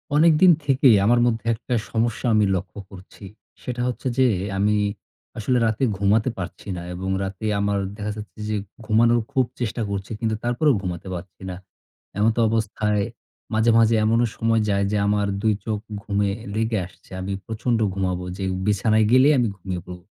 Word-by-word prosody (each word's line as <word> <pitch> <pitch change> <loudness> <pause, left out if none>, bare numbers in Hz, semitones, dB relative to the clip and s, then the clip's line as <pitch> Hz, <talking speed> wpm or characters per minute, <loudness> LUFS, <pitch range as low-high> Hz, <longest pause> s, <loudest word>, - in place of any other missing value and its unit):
অনেকদিন 165 +3 +6
থেকেই 135 -4 +5
আমার 120 +3 +4
মধ্যে 115 -2 -1
একটা 120 +2 -5 0.2
সমস্যা 115 +1 -1
আমি 105 -1 +4
লক্ষ্য 95 +2 -5
করছি, 95 +2 -13 0.4
সেটা 125 -1 -4
হচ্ছে 125 +1 -3
যে, 130 - +5 0.3
আমি 105 +2 +2 0.6
আসলে 125 +4 +1
রাতে 110 +4 -1
ঘুমাতে 105 +4 +2
পারছি 90 +2 -7
না - - -5
এবং 95 +2 -4
রাতে 95 +2 -5
আমার 100 0 +1 0.2
দেখা 105 0 -3
যাচ্ছে 105 +1 -10
যে 110 - 0 0.3
ঘুমানোর 115 +2 +4
খুব 130 -3 +2
চেষ্টা 120 -1 -2
করছি। 100 0 -4
কিন্তু 110 -1 0
তারপরেও 125 +5 +2
ঘুমাতে 90 -1 -5
পারছি 90 +1 -9
না। 90 - -5 0.6
এমতবস্থায়, 110 -1 +1 0.5
মাঝে, 110 +1 +3
মাঝে 115 0 +5
এমনও 115 +2 +3
সময় 115 0 +2
যায়, 100 0 +2
যে 105 - +1
আমার 105 0 +1
২ 110 0 +3
চোখ 110 -2 -1 0.2
ঘুমে 100 -1 0 0.2
লেগে 110 0 0
আসছে। 95 - -23
আমি 95 +1 -3
প্রচন্ড 115 +1 -1
ঘুমাবো, 90 -2 -2
যে 95 - -4 0.2
বিছানায় 110 +2 +3
গেলেই 130 +4 +6
আমি 120 - +2
ঘুমিয়ে 90 -1 -5
পড়ব। 90 0 -9
110 Hz, 165 wpm, -23 LUFS, 100-115 Hz, 0.6 s, অনেকদিন